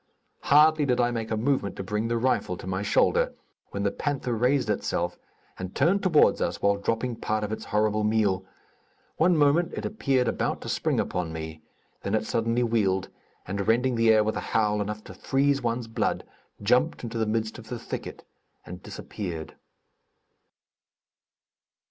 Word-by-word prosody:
Hardly 150 +1 +5
did 125 -1 +2
I 120 0 +3
make 115 -2 -3
a 110 - -1
movement 120 -4 0
to 100 - -5
bring 105 +4 -2
the 115 0 0
rifle 115 -7 0
to - - -10
my 95 +1 -2
shoulder, 100 - +2 0.3
when 100 - -3
the 100 - +1
panther 140 -4 -2
raised 125 +2 +2
itself, 90 -4 -1 0.4
and 95 0 -6
turned 195 +4 +3
toward 175 -6 +4
us - - -1
while 100 0 +2
dropping 115 +3 -2
part 110 -1 -1
of 105 - -3
its 110 - -4
horrible 105 0 +1
meal. 105 -3 +2 0.7
One 170 +1 +4
moment, 150 +4 +3
it - - -4
appeared 135 - +1
about - - -1
to - - -6
spring - - 0
upon 90 -2 -2
me, 80 -1 -6 0.4
then 100 - -1
it 110 0 0
suddenly 115 +2 0
wheeled, 100 -5 +1 0.4
and 100 +1 -3
rending 125 +3 +3
the 115 -1 +3
air 110 -1 +5
with 110 +1 -1
a - - -1
howl, 105 -1 +1
enough 105 +1 -4
to - - -10
freeze 140 +1 +1
one's 120 -1 -2
blood, 115 - -1 0.4
jumped 125 +10 +2
into 115 -1 -4
the 110 - +1
midst 110 +1 -2
of 110 -2 -13
the 125 - -3
thicket - - -7 0.4
and 90 0 -9
disappeared. 85 -6 -6
110 Hz, 175 wpm, -26 LUFS, 100-125 Hz, 0.7 s, Hardly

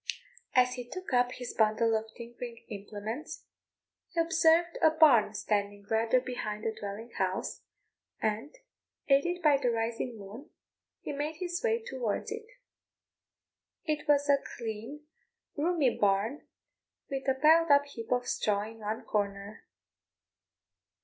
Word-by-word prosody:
As 250 0 +5
he 245 -1 -7
took 370 -3 -6
up 245 0 +3
his 245 -1 -6
bundle 220 +1 +3
of 220 0 -1
tinkering 235 0 -8
implements, 210 +7 -6 0.6
he 340 - -3
observed 330 +1 +3
a 320 - +7
barn 275 -10 +5
standing 205 -1 -1
rather 225 +3 +3
behind 215 -4 -4
the 225 - -1
dwelling 210 +3 -7
house, 190 -1 -1 0.6
and, 220 +7 -1 0.6
aided 345 +6 +3
by 295 -3 +6
the 260 -3 +1
rising 230 +1 -2
moon, 210 - -10 0.5
he - - -5
made 295 +2 -3
his 350 +1 -3
way 460 -1 +1
towards 250 - -3
it. 445 0 -6 1.4
It 305 -3 -2
was 290 0 +4
a 280 -1 +5 0.2
clean, 230 +5 -6 0.5
roomy 305 -4 +2
barn, 205 +7 +1 0.6
with 270 0 -3
a 265 - +3
piled 320 +4 +5
up 285 0 +6
heap 230 -6 -9
of 250 0 +1
straw 205 -1 0
in 225 +1 -9
one 215 +1 -4
corner. 200 0 -3
245 Hz, 135 wpm, -30 LUFS, 215-295 Hz, 1.4 s, a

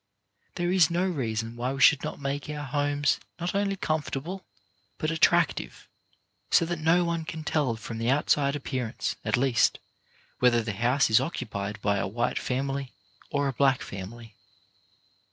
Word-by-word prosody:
There 175 -1 0
is 180 -4 +5
no 175 +2 +1
reason 115 - -2
why 125 +2 -2
we 135 - -4
should 150 - +6
not - - -4
make 140 +1 -3
our 150 -1 -4
homes 145 +1 +1 0.2
not 175 +1 -2
only 200 0 0
comfortable, 155 +2 -3 0.5
but 155 - -1
attractive, 165 0 +1 0.6
so - - +4
that 170 0 -3
no 165 +3 +3
one 170 -1 -1
can 160 0 -6
tell 145 -6 0
from 115 +1 -7
the 115 +1 0
outside 140 0 +2
appearance, 130 -5 -3
at - - +1
least, 125 -2 +3 0.6
whether 120 -2 +4
the 110 -2 -3
house 120 +5 +2
is 110 - +7
occupied 105 -8 -4
by 100 -1 +2
a - - -1
white 120 +5 -1
family 135 +1 -2 0.4
or 145 -1 0
a 135 - -1
black 135 +1 +2
family. 110 +4 -8
140 Hz, 160 wpm, -27 LUFS, 120-160 Hz, 0.6 s, is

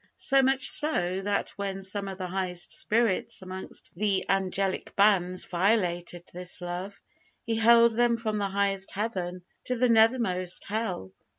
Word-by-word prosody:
So 270 -1 +3
much 265 0 +3
so, 190 - +2
that 200 0 -1
when 195 -1 -4
some 195 +1 -2
of 190 -1 -6
the 185 - -4
highest 180 -1 -3
spirits 215 -4 0
amongst 185 0 -6
the 200 +1 0
angelic 195 0 -1
bands 185 -3 +2
violated 175 -2 0
this 180 0 -5
love, 180 +3 -6 0.5
He 230 - -1
hurled 230 0 +5
them 240 0 +2
from 215 -2 -2
the 200 -1 -1
highest 195 -1 -1
Heaven 185 -4 -3 0.2
to 250 - -1
the 250 +1 +2
nethermost 220 -6 +2
hell! 200 - -3
195 Hz, 150 wpm, -27 LUFS, 185-225 Hz, 0.5 s, hurled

